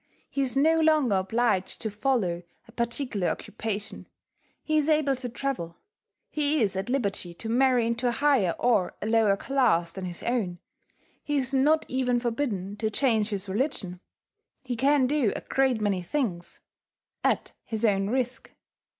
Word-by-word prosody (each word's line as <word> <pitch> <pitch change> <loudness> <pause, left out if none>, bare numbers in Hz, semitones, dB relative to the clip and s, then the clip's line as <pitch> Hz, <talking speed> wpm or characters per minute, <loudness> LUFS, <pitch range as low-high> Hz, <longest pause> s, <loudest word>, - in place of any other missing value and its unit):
He 280 - -1
is 265 -1 -1
no 320 +3 +4
longer 310 -7 +3
obliged 195 0 0
to 220 - -2
follow 205 -6 0 0.3
a - - -15
particular 235 -4 -2
occupation; 210 -1 -4 0.6
he 310 - -1
is 300 +1 0
able 300 -3 +3
to 250 -1 -5
travel; 235 -10 -4 0.5
he 300 0 +1
is 195 -2 0
at 195 +4 -3
liberty 200 -9 -2
to 225 - -7
marry 250 0 +3
into 235 +2 0
a - - +2
higher 245 - +2
or 230 -7 +2
a - - -5
lower 220 -3 +3
class 245 -10 +1
than 190 -1 -6
his 175 -1 -6
own; 215 -8 -1 0.7
he 295 -1 -1
is 265 0 -2
not 300 +4 +3
even 250 -1 +1
forbidden 225 -6 -2
to 220 0 -1
change 220 -2 +2
his 200 -2 -3
religion; 195 - -2 0.6
he 250 -2 -3
can 275 +2 +3
do 265 -5 +1
a - - -4
great 265 -3 +1
many 200 -3 +1
things 180 -4 -3 0.6
at - - +1
his 225 0 -2
own 195 -2 +2
risk. 255 +1 -2
235 Hz, 160 wpm, -27 LUFS, 200-270 Hz, 0.7 s, no